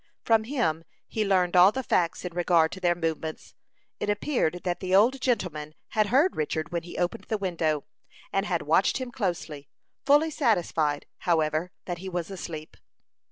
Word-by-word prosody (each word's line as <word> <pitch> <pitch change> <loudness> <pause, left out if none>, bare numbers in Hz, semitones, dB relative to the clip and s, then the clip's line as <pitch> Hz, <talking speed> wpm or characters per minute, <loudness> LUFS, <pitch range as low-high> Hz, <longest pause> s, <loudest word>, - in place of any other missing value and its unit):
From 225 -1 +3
him 165 - 0 0.2
he 220 - -1
learned 185 -3 +2
all 180 +2 +8
the 265 +3 -3
facts 175 -5 0
in 180 - -5
regard 170 -2 +3
to 190 - -7
their 175 -2 +2
movements. 160 -2 -4 0.5
It - - -2
appeared 205 - 0
that 175 -1 -1
the 185 0 +1
old 245 +7 +4
gentleman 160 - -1
had 215 -1 +1
heard 280 - +3
Richard 155 +1 -2
when 170 -1 -1
he 170 +1 -10
opened 175 0 -2
the 220 - -1
window, 165 -6 -1 0.5
and 195 +2 +1
had 175 -3 -1
watched 160 +6 +3
him 255 -2 -5
closely, 170 - -3 0.3
fully 295 +3 +4
satisfied, 170 - +1
however, 160 0 +1
that 175 -2 -4
he 190 +1 -6
was 175 0 -4
asleep. 160 -5 -7
180 Hz, 170 wpm, -27 LUFS, 160-210 Hz, 0.5 s, all